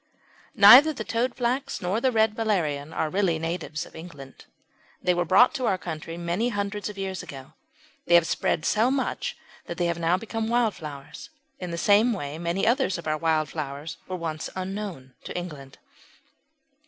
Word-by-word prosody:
Neither 295 +5 +9
the 220 -6 -6
Toadflax 245 +3 -1
nor 190 +6 -1
the 260 - +2
Red 220 -2 +3
Valerian 165 -10 -1
are 155 -1 -2
really 185 -4 +1
natives 165 0 -4
of - - -16
England. 160 -5 -11 0.5
They 180 - +1
were 175 0 0
brought 195 - +5
to 260 -5 -1
our 190 - +2
country 165 -1 -6
many 175 +7 -1
hundreds 205 -1 -3
of 205 - -9
years 190 -1 -4
ago. 135 -1 -10 0.5
They 175 - +5
have 170 -1 +6
spread 160 -1 -1
so 225 +3 +3
much 265 -1 -2 0.3
that 170 - -6
they 175 - 0
have 170 0 -1
now 170 +2 +2
become 225 +2 -4
wildflowers. 210 - -3 0.3
In 180 - -5
the 170 - -4
same 210 +6 +4
way 150 -5 -5
many 170 +4 -1
others 235 -4 +2
of 170 - -9
our 155 0 0
wild 155 -2 +1
flowers 150 +1 -6
were 185 - -4
once 160 -3 -4
unknown 185 -8 -5
in - - -6
England. 150 -7 -7
180 Hz, 175 wpm, -26 LUFS, 160-220 Hz, 0.5 s, Neither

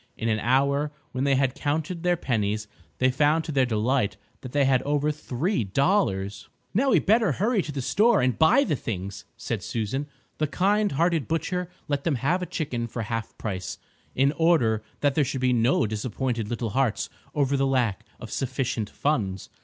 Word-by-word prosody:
In 115 - -1
an 110 -1 +1
hour, 140 +5 +2 0.2
when 130 +2 -1
they 140 -1 +3
had 130 -1 +2
counted 155 +5 -2
their 175 0 +2
pennies, 105 -6 -1 0.3
they 130 0 +3
found 150 +4 +2
to - - -4
their 135 -3 +2
delight 110 -1 +1 0.2
that 130 - -9
they 145 0 +3
had 130 -1 +3
over 145 +1 +1
three 150 - -1
dollars. 100 - 0 0.2
"Now 260 +8 +2
we - - +5
had - - +2
better 220 -5 +4
hurry 210 - +1
to 155 - -5
the 135 -3 -4
store 215 - +4
and 125 -1 +2
buy 240 - +6
the 165 - 0
things," 100 -4 -5
said 110 -2 -3
Susan. 115 +9 -3 0.3
The 155 - +1
kind 205 +5 +1
hearted 165 0 +1
butcher 180 +2 -1 0.2
let 145 -1 -1
them 160 -4 +1
have 155 +9 0
a 180 - -3
chicken 125 -7 -3
for 115 0 -4
half 115 +1 -4
price, 95 -4 -4 0.4
in 135 +2 +3
order 145 -9 +2 0.2
that 145 -2 +3
there 150 - +3
should 135 0 -2
be 125 -1 +3
no 120 +2 +3
disappointed 115 +1 -2
little 115 -2 -2
hearts 130 -3 +1 0.3
over 140 -1 +2
the 135 0 +2
lack 125 -7 +1 0.2
of - - -9
sufficient 125 -5 -2
funds. 100 -10 -1
135 Hz, 190 wpm, -26 LUFS, 115-155 Hz, 0.4 s, buy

